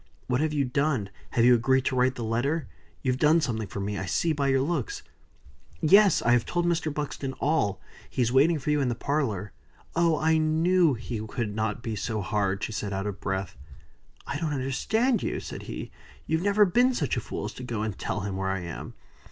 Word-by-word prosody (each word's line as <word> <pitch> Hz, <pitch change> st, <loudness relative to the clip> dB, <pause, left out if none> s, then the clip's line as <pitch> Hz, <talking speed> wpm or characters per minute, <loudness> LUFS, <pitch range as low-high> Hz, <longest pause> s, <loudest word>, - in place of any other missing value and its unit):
"What 125 Hz, +2 st, 0 dB
have 155 Hz, 0 st, +1 dB
you 145 Hz, -2 st, +1 dB
done? 130 Hz, -6 st, 0 dB, 0.2 s
Have 115 Hz, -, +4 dB
you 125 Hz, -, +7 dB
agreed 130 Hz, +3 st, +3 dB
to 130 Hz, -, 0 dB
write 130 Hz, +1 st, +2 dB
the 120 Hz, -, -4 dB
letter? 130 Hz, +8 st, -1 dB, 0.4 s
You've 130 Hz, -1 st, 0 dB
done 155 Hz, +3 st, +5 dB
something 115 Hz, -8 st, -2 dB
for 100 Hz, -, -6 dB
me, 100 Hz, +1 st, -2 dB
I 95 Hz, -, -4 dB
see 160 Hz, -, +1 dB
by 140 Hz, -2 st, 0 dB
your 135 Hz, -1 st, +3 dB
looks." 410 Hz, -, -2 dB, 0.8 s
"Yes! 195 Hz, +3 st, +5 dB
I 120 Hz, -, +3 dB
have 120 Hz, -1 st, +4 dB
told 175 Hz, -1 st, -1 dB
Mr. 170 Hz, -2 st, 0 dB
Buxton 145 Hz, -2 st, -4 dB
all. 130 Hz, -9 st, 0 dB, 0.3 s
He 130 Hz, -, 0 dB
is 115 Hz, -, 0 dB
waiting 150 Hz, +6 st, +4 dB
for 150 Hz, +1 st, -2 dB
you 150 Hz, -1 st, +2 dB
in 130 Hz, -, +1 dB
the 120 Hz, -, -1 dB
parlor. 115 Hz, -8 st, -1 dB, 0.4 s
Oh! 165 Hz, -2 st, +3 dB
I 160 Hz, +1 st, +3 dB
knew 160 Hz, 0 st, +3 dB
he 115 Hz, 0 st, -5 dB
could 110 Hz, -2 st, -3 dB
not 110 Hz, +1 st, -2 dB
be 115 Hz, -2 st, -3 dB
so 110 Hz, +1 st, -2 dB
hard!" 100 Hz, 0 st, -1 dB
She -, -, -2 dB
was 105 Hz, -1 st, -3 dB
out 95 Hz, 0 st, -2 dB
of 105 Hz, -1 st, -5 dB
breath. 95 Hz, -3 st, -3 dB, 0.7 s
"I 145 Hz, -, -3 dB
don't 160 Hz, -3 st, -1 dB
understand 220 Hz, -, +1 dB
you!" -, -, -2 dB
said -, -, -7 dB
he. -, -, -6 dB, 0.3 s
"You've 160 Hz, +1 st, 0 dB
never 205 Hz, +2 st, +4 dB
been 245 Hz, +7 st, +3 dB
such 145 Hz, -, 0 dB
a -, -, 0 dB
fool 105 Hz, -, -5 dB
as 105 Hz, -, -5 dB
to 125 Hz, -, -9 dB
go 115 Hz, -4 st, -3 dB
and 110 Hz, -3 st, -3 dB
tell 100 Hz, +1 st, -3 dB
him 100 Hz, -1 st, -3 dB
where 95 Hz, 0 st, -1 dB
I 95 Hz, -1 st, -1 dB
am?" 85 Hz, -2 st, -7 dB
130 Hz, 220 wpm, -27 LUFS, 110-155 Hz, 0.8 s, you